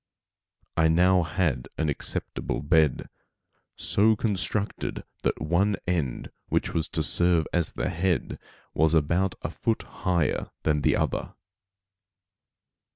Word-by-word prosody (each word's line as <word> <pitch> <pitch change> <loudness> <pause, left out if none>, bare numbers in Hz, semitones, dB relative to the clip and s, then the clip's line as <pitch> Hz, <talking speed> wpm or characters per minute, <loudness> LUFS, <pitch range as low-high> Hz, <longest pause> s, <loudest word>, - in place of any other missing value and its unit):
I 80 - +5
now 90 +3 +4
had 80 -7 -1
an 80 - 0
acceptable 75 0 -2
bed, 75 -3 +2 0.7
so 110 +2 +2
constructed 105 -1 -2 0.2
that - - 0
one 90 +7 +2
end 80 -9 -2 0.2
which - - -1
was 80 -1 0
to 80 - -1
serve 85 +2 +3
as 85 -3 0
the - - -2
head, 90 0 -1 0.3
was 80 +2 +3
about 85 +5 +1
a - - -3
foot 115 -1 -1 0.2
higher 90 -5 0
than 75 -2 +1
the - - +3
other. - - -2
85 Hz, 120 wpm, -26 LUFS, 80-95 Hz, 0.7 s, I